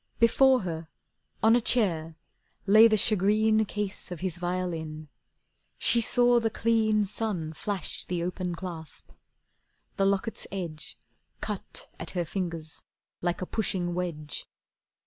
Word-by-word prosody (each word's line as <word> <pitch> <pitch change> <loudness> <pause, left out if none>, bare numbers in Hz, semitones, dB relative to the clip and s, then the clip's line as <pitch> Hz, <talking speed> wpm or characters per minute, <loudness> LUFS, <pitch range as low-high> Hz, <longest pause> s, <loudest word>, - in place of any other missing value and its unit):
Before 255 +2 +5
her, 165 -3 -5 0.6
on 225 +1 +6
a 245 - +3
chair, 165 -10 +1 0.5
lay 215 +3 +8
the 215 -1 +3
shagreen 215 +2 +3
Case 205 -1 -3
of 180 - -6
his 185 -2 -2
violin. 170 -4 -3 0.7
She 235 0 +4
saw 245 +1 +4
the 225 -1 0
clean 220 -1 +2
Sun 195 -6 -3
flash 200 +3 -4
the 175 -1 -2
open 180 0 -3
clasp. 165 -3 -7 0.9
The 195 - +3
locket's 200 +3 -1
edge 170 -6 -5 0.4
Cut - - -5
at - - -4
her 175 - +1
fingers 165 -3 -5 0.4
like 175 +1 -1
a - - -2
pushing 180 -4 -1
wedge. 165 -5 -4
185 Hz, 125 wpm, -28 LUFS, 170-220 Hz, 0.9 s, lay